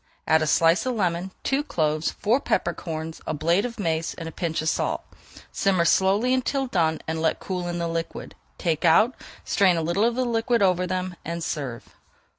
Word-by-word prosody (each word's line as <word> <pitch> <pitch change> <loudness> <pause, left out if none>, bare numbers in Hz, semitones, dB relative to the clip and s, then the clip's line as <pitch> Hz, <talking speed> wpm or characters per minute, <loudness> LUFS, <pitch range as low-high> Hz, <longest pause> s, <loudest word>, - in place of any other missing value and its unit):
Add 160 0 +4
a 155 - 0
slice 165 +9 +3
of 255 - 0
lemon, 180 -3 -1
two 270 +1 +1
cloves, 155 - 0
four 225 +6 +1
pepper 175 -9 0
corns, 160 -1 -6
a - - -1
blade 170 +7 +2
of 240 -1 -6
mace, 165 -3 -1
and 165 - -7
a - - -6
pinch 165 -1 -2
of 160 - +1
salt. - - -1 0.5
Simmer 185 -4 +2
slowly 200 +8 +3
until 265 +1 0
done 165 -9 0
and 160 0 -2
let 160 - +1
cool 180 -2 -4
in 175 0 -3
the 170 -1 -1
liquid. 165 0 -4 0.2
Take 165 -3 -1
out, 180 +9 +5 0.3
strain 185 -3 +3
a 165 - -1
little 170 +6 +1
of 235 0 +2
the 255 0 0
liquid 230 -1 +1
over 180 -1 +2
them, 185 0 -3
and 170 0 -4
serve. 130 -8 -5
175 Hz, 200 wpm, -25 LUFS, 160-205 Hz, 0.5 s, out